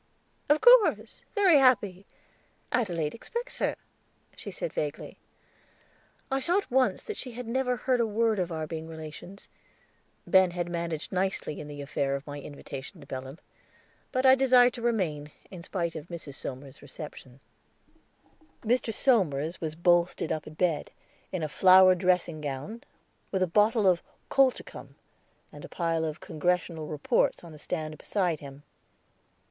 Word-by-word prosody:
"Of 295 Hz, +1 st, +4 dB
course, -, -, +5 dB
very 380 Hz, -8 st, +6 dB
happy; 205 Hz, -8 st, +2 dB, 0.6 s
Adelaide 175 Hz, -11 st, 0 dB
expects 475 Hz, -, -6 dB
her," -, -, 0 dB, 0.6 s
she -, -, -8 dB
said -, -, -4 dB
vaguely. -, -, -4 dB, 1.1 s
I 270 Hz, -, +1 dB
saw 345 Hz, +7 st, +2 dB
at 405 Hz, -, -3 dB
once 260 Hz, 0 st, +2 dB
that 430 Hz, -, -6 dB
she 250 Hz, -2 st, -7 dB
had 245 Hz, 0 st, -7 dB
never 250 Hz, +1 st, 0 dB
heard 250 Hz, +2 st, +1 dB
a 230 Hz, -, +2 dB
word 220 Hz, 0 st, +1 dB
of 180 Hz, -1 st, -1 dB
our 160 Hz, -1 st, -3 dB
being 160 Hz, 0 st, -6 dB
relations. 160 Hz, +4 st, -10 dB, 0.8 s
Ben 190 Hz, -1 st, +5 dB
had 175 Hz, 0 st, -3 dB
managed 170 Hz, -2 st, -4 dB
nicely 190 Hz, -5 st, -2 dB
in 150 Hz, -, -7 dB
the 145 Hz, -1 st, -7 dB
affair 140 Hz, -1 st, -1 dB
of 140 Hz, +1 st, -6 dB
my 145 Hz, -1 st, -7 dB
invitation 140 Hz, +3 st, -9 dB
to 145 Hz, -, -13 dB
Belem. 130 Hz, +1 st, -7 dB, 0.7 s
But 255 Hz, 0 st, 0 dB
I 260 Hz, -, +9 dB
desired 255 Hz, -2 st, +5 dB
to 240 Hz, -, -8 dB
remain, 180 Hz, -11 st, -1 dB, 0.2 s
in 180 Hz, -3 st, -8 dB
spite 170 Hz, -1 st, -3 dB
of 155 Hz, +1 st, -8 dB
Mrs. 170 Hz, -5 st, -7 dB
Somers's 135 Hz, 0 st, -8 dB
reception. 135 Hz, -4 st, -10 dB, 1.2 s
Mr. 240 Hz, 0 st, +1 dB
Somers 175 Hz, -, +1 dB
was 155 Hz, -1 st, -3 dB
bolstered 175 Hz, 0 st, +2 dB
up 155 Hz, -, -3 dB
in 155 Hz, -, -10 dB
bed, 165 Hz, -3 st, 0 dB, 0.4 s
in 185 Hz, -4 st, -3 dB
a -, -, 0 dB
flowered 185 Hz, +3 st, +6 dB
dressing 180 Hz, -4 st, +1 dB
gown, 145 Hz, -, -5 dB, 0.5 s
with 190 Hz, -1 st, 0 dB
a -, -, +4 dB
bottle 210 Hz, +4 st, +3 dB
of 180 Hz, -2 st, +4 dB, 0.3 s
colchicum 270 Hz, -2 st, 0 dB, 0.6 s
and -, -, -11 dB
a -, -, -9 dB
pile 165 Hz, -2 st, -1 dB
of 155 Hz, +1 st, -4 dB
Congressional 165 Hz, -1 st, -1 dB
reports 150 Hz, +3 st, 0 dB
on 170 Hz, -2 st, -11 dB
a 150 Hz, -, -12 dB
stand 155 Hz, -1 st, -4 dB
beside 180 Hz, -6 st, -1 dB
him. 140 Hz, 0 st, -11 dB
175 Hz, 155 wpm, -28 LUFS, 155-230 Hz, 1.2 s, I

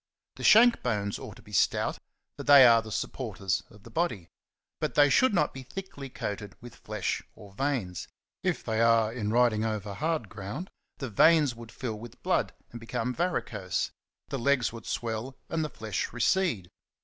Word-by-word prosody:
The -, -, -7 dB
shank 235 Hz, +2 st, +7 dB
bones 105 Hz, -4 st, -1 dB
ought -, -, -9 dB
to -, -, -16 dB
be -, -, -15 dB
stout, -, -, +1 dB, 0.4 s
for -, -, -7 dB
they 140 Hz, -2 st, +8 dB
are 115 Hz, -1 st, +7 dB
the 110 Hz, -1 st, -10 dB
supporters 95 Hz, -3 st, -2 dB
of 105 Hz, -1 st, -18 dB
the 115 Hz, -, -13 dB
body; 110 Hz, -, -1 dB, 0.5 s
but -, -, -2 dB
they 145 Hz, -1 st, +6 dB
should 260 Hz, -, +5 dB
not 175 Hz, -7 st, +1 dB
be 135 Hz, -, -7 dB
thickly 140 Hz, -1 st, -8 dB
coated 105 Hz, -4 st, -5 dB
with 120 Hz, -1 st, -11 dB
flesh 105 Hz, -4 st, -3 dB
or 100 Hz, -3 st, -14 dB
veins: 110 Hz, -, -2 dB, 0.3 s
if -, -, -1 dB
they 110 Hz, 0 st, 0 dB
are, 115 Hz, -1 st, +4 dB
in 110 Hz, -4 st, -2 dB
riding 115 Hz, -2 st, +3 dB
over 105 Hz, -2 st, -3 dB
hard 155 Hz, -1 st, -1 dB
ground 105 Hz, -, -7 dB, 0.3 s
the 130 Hz, -4 st, -5 dB
veins 150 Hz, +4 st, +5 dB
would 115 Hz, -1 st, -11 dB
fill 110 Hz, -5 st, -5 dB
with 120 Hz, +1 st, -12 dB
blood -, -, +1 dB, 0.2 s
and 120 Hz, -, -8 dB
become 120 Hz, +1 st, -3 dB
varicose, 105 Hz, -, -2 dB, 0.4 s
the 135 Hz, -, -3 dB
legs 125 Hz, -2 st, +2 dB
would 115 Hz, -1 st, -9 dB
swell, 115 Hz, +3 st, -3 dB
and 165 Hz, -1 st, -1 dB
the 155 Hz, -, -3 dB
flesh 110 Hz, -6 st, -4 dB
recede. 120 Hz, -, +1 dB
115 Hz, 180 wpm, -28 LUFS, 105-140 Hz, 0.5 s, they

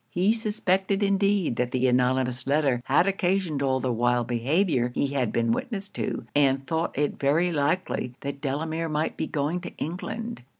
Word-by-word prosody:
He 185 Hz, -, +2 dB
suspected 200 Hz, -3 st, 0 dB
indeed 200 Hz, -, +2 dB
that 125 Hz, -1 st, 0 dB
the 130 Hz, +1 st, 0 dB
anonymous 125 Hz, 0 st, +1 dB
letter 140 Hz, -4 st, +2 dB
had 145 Hz, +6 st, +4 dB
occasioned 190 Hz, -5 st, 0 dB
all 130 Hz, -1 st, +1 dB
the 130 Hz, -2 st, -1 dB
wild 120 Hz, +1 st, +1 dB
behaviour 125 Hz, -, +1 dB
he 140 Hz, -, +1 dB
had 130 Hz, -5 st, 0 dB
been 115 Hz, -1 st, +1 dB
witness 200 Hz, -, -2 dB
to, -, -, -4 dB
and 135 Hz, -1 st, +2 dB
thought 160 Hz, -1 st, -2 dB
it 145 Hz, 0 st, 0 dB
very 160 Hz, +6 st, +2 dB
likely 145 Hz, -4 st, -1 dB
that 140 Hz, 0 st, -5 dB
Delamere 160 Hz, +4 st, -2 dB
might 155 Hz, +1 st, -1 dB
be -, -, -3 dB
going 155 Hz, +4 st, -1 dB
to -, -, -9 dB
England. 225 Hz, -, -5 dB
145 Hz, 170 wpm, -26 LUFS, 130-185 Hz, -, had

